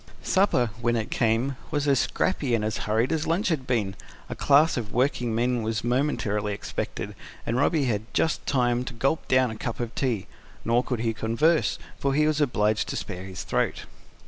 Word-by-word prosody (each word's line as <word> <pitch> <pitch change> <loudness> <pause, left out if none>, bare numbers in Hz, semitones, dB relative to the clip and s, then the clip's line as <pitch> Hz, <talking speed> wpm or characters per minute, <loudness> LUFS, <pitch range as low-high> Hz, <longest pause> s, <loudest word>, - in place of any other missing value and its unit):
Supper, 160 - +2
when 120 0 +2
it 115 +4 -2
came, 125 -2 +1
was 145 -2 -1
as 135 -3 +4
scrappy 140 -9 0
and 105 -2 -1
as 110 -1 -1
hurried 115 +5 +2
as 160 -1 0
lunch 175 +5 +1
had 140 -6 -1
been: 110 -6 0 0.4
a - - -4
class 145 +3 +4
of 110 -4 -4
working 125 -2 +1
men 120 +1 +1
was 110 0 -2
momently 115 -5 0
expected, - - -4 0.3
and 115 - -1
Robby 145 +2 +2
had 110 -2 -2
just 160 - +1
time 125 -2 +2
to 125 - -6
gulp 135 +7 0
down 130 -2 +3
a - - -6
cup 115 +1 -4
of 120 -1 -3
tea. 120 -8 -1 0.4
Nor 120 +2 +3
could 125 -4 -2
he 115 -1 0
converse; 115 - +2 0.2
for 140 -1 0
he 150 +1 +4
was 155 0 +1
obliged 105 -6 +1
to - - -3
spare 95 -2 -5
his 95 -1 -6
throat. - - -1
120 Hz, 195 wpm, -26 LUFS, 110-140 Hz, 0.4 s, as